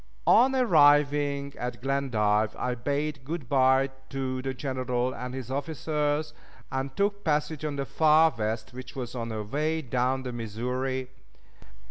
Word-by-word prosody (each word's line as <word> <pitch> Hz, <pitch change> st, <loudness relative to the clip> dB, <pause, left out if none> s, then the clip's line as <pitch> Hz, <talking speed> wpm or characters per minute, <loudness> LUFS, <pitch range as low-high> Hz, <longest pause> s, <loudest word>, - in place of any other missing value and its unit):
On 260 Hz, +3 st, +5 dB
arriving 145 Hz, -, +4 dB
at 125 Hz, +1 st, -4 dB
Glendive 110 Hz, -6 st, +1 dB
I 125 Hz, -, -1 dB
bade 140 Hz, +3 st, -2 dB
good 150 Hz, -1 st, -5 dB
by 130 Hz, 0 st, +3 dB, 0.2 s
to 130 Hz, -1 st, -3 dB
the 135 Hz, +1 st, -2 dB
General 130 Hz, -2 st, -2 dB
and 125 Hz, +1 st, -6 dB
his 130 Hz, -1 st, -6 dB
officers, 150 Hz, +1 st, -1 dB, 0.4 s
and 135 Hz, 0 st, -3 dB
took 200 Hz, 0 st, 0 dB
passage 150 Hz, -1 st, 0 dB
on 150 Hz, -2 st, -2 dB
the 140 Hz, -1 st, -2 dB
Far 160 Hz, +1 st, +4 dB
West, 110 Hz, +2 st, -3 dB
which 130 Hz, +1 st, -9 dB
was 125 Hz, -3 st, -5 dB
on 115 Hz, -2 st, -4 dB
her 110 Hz, -1 st, -3 dB
way 155 Hz, +8 st, -1 dB
down 130 Hz, +1 st, 0 dB
the 125 Hz, -1 st, -5 dB
Missouri. 125 Hz, +3 st, -3 dB
135 Hz, 145 wpm, -27 LUFS, 125-150 Hz, 0.4 s, On